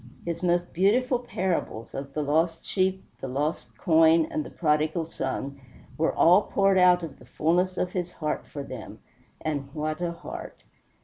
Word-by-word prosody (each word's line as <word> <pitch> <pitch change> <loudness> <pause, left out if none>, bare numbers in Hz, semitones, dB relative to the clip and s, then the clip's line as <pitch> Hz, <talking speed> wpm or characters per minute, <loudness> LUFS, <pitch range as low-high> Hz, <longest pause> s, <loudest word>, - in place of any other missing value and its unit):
His 170 -1 -3
most 175 -1 +1
beautiful 240 +8 +3
parables, 185 - -3
of 135 0 -6
the 150 - 0
lost 160 +3 +1
sheep, 190 0 0 0.2
the - - -5
lost 135 -4 -3
coin, 160 +1 +5
and 155 - -1
the - - -9
Prodigal 155 +1 +1
Son, 140 -2 -4 0.3
were 160 +1 +1
all 180 +4 +6
poured 195 -2 +2
out 180 -1 +5
of 150 -4 -7
the - - -15
fullness 180 +4 +1
of 180 - -1
his 180 -1 -3
heart 155 -2 -3
for 145 - -6
them 130 -5 -8 0.4
and 145 -3 -3
what 155 +1 -2
a 175 -1 0
heart! 170 +1 -9
165 Hz, 170 wpm, -27 LUFS, 150-180 Hz, 0.4 s, all